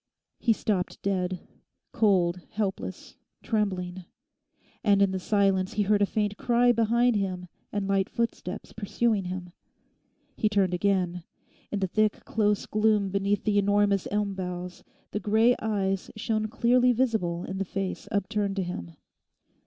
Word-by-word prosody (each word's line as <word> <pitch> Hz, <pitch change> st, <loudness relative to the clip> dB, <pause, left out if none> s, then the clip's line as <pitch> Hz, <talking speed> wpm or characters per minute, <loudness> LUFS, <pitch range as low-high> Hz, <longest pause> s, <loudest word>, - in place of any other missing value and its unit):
He 235 Hz, -, +2 dB
stopped 205 Hz, -4 st, -1 dB
dead—cold, 185 Hz, 0 st, -1 dB
helpless, 200 Hz, -2 st, -4 dB, 0.3 s
trembling. 185 Hz, -4 st, -2 dB, 0.8 s
And, 200 Hz, -1 st, +4 dB
in 200 Hz, -1 st, +4 dB
the 190 Hz, -, -2 dB
silence 195 Hz, 0 st, +1 dB
he 210 Hz, -, +1 dB
heard 205 Hz, +1 st, +2 dB
a 200 Hz, -, +4 dB
faint 205 Hz, -1 st, -1 dB
cry 245 Hz, 0 st, +3 dB
behind 235 Hz, +1 st, +3 dB
him 185 Hz, -3 st, -2 dB, 0.3 s
and 205 Hz, -2 st, -2 dB
light 195 Hz, -1 st, +1 dB
footsteps 230 Hz, -4 st, -3 dB
pursuing 220 Hz, -1 st, 0 dB
him. 180 Hz, -1 st, -5 dB, 0.8 s
He 215 Hz, -, +1 dB
turned 195 Hz, -3 st, +2 dB
again. 180 Hz, -1 st, +1 dB, 0.5 s
In 205 Hz, -, -2 dB
the 190 Hz, -, +1 dB
thick 215 Hz, +3 st, 0 dB
close 210 Hz, -2 st, +1 dB
gloom 215 Hz, -2 st, +2 dB
beneath 200 Hz, +1 st, 0 dB
the 205 Hz, -2 st, +2 dB
enormous 205 Hz, -1 st, +2 dB
elm 205 Hz, -1 st, 0 dB
boughs 180 Hz, -1 st, -6 dB, 0.3 s
the 210 Hz, -, -2 dB
grey 220 Hz, +4 st, +3 dB
eyes 195 Hz, -3 st, -1 dB
shone 215 Hz, 0 st, -1 dB
clearly 245 Hz, +3 st, +3 dB
visible 220 Hz, -9 st, 0 dB
in 190 Hz, 0 st, -5 dB
the -, -, +1 dB
face 195 Hz, 0 st, -4 dB
upturned 200 Hz, 0 st, -1 dB
to 195 Hz, -, 0 dB
him. 85 Hz, -, -6 dB
200 Hz, 140 wpm, -27 LUFS, 185-215 Hz, 0.8 s, And